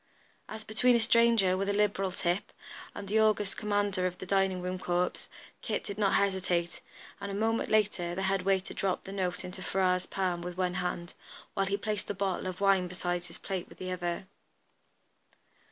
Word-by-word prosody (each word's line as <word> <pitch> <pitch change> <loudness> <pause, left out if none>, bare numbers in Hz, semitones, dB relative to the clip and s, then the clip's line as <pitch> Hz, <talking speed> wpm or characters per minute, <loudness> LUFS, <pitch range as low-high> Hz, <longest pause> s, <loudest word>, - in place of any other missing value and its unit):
As 220 0 -6
between 240 +4 +3
a - - +4
stranger 230 -4 +4
with 195 +1 -1
a - - +2
liberal 200 -2 +2
tip, 180 +1 -1 0.4
and 200 - -6
the 215 +3 +2
august 210 -2 +2
commander 205 -3 +1
of 180 0 -5
the - - -7
dining 195 -1 +2
room 180 +1 -3
corps, 180 0 -1 0.3
Kit - - -2
did 200 +1 -6
not 200 -2 +3
hesitate, 185 -3 +1 0.4
and 200 0 -5
a 195 - -3
moment 225 +2 +1
later 200 -5 +1
the 190 - -2
head 190 0 +1
waiter 190 0 +1
dropped 190 -2 -1
the 195 - -7
note 185 -2 -2
into 185 +1 -7
Ferrars' 185 -1 +1
palm 180 -3 -1
with 175 0 -6
one 180 -1 +1
hand, 175 -1 -3 0.4
while 195 -2 +1
he 200 +1 +1
placed 210 -1 -3
a 205 - -1
bottle 190 -1 -1
of 185 -1 -5
wine 195 -2 +4
beside 175 0 -2
his 165 - -10
plate 190 -3 -4
with - - -14
the 185 0 -4
other. 175 0 -2
190 Hz, 190 wpm, -30 LUFS, 180-205 Hz, 0.4 s, a